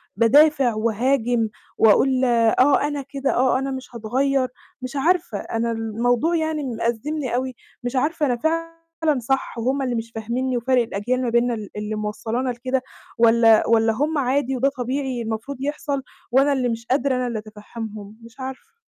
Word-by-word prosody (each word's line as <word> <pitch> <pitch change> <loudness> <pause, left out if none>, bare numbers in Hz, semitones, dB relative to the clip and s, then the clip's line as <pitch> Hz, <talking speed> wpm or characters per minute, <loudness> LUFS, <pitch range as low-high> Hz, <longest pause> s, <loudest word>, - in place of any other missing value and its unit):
بادافع 270 +2 +5
وأهاجم، 230 +1 +1 0.3
وأقول 255 +4 +4
آه، 240 +3 +4
أنا 290 -1 -3
كده، 275 0 -2
آه، 255 +1 +3
أنا 270 0 -3
مش 260 -2 -7
هاتغيّر، 260 +4 0 0.3
مش 255 +1 -6
عارفة، 325 - +1
أنا 230 +1 -2
الموضوع 235 +7 0
يعني 315 -2 -1
مأزّمني 245 +3 -2
أوي، 255 0 -2 0.3
مش 245 +2 -3
عارفة 300 +4 +1
أنا 250 -3 +1
فعلًا 330 0 -2
صح 265 +1 -2
وهم 260 +4 0
اللي 250 -2 -1
مش 230 0 -4
فاهمينّي، 240 +3 -2
وفَرق 250 +1 +2
الأجيال 235 +3 -2
ما 250 - 0
بيننا 235 +1 +2
ال 215 -3 -6
اللي 210 +1 -3
موصّلانا 220 +4 -2
لكده، 255 +2 -1 0.4
والَّا 230 -1 +5
والَّا 225 -1 +3
هم 295 +7 0
عادي 265 0 0
وده 270 +3 +3
طبيعي 255 0 -2
المفروض 225 +5 -4
يحصل، 285 -1 -2 0.3
وأنا 275 +3 +4
اللي 255 -3 0
مش 230 0 -4
قادرة 260 +1 +1
أنا 250 0 -1
اللي 235 -2 -3
أتفهّمهم؟ 215 0 -9
مش 230 +3 -15
عارفة. 260 0 -7
250 Hz, 160 wpm, -22 LUFS, 230-275 Hz, 0.4 s, بادافع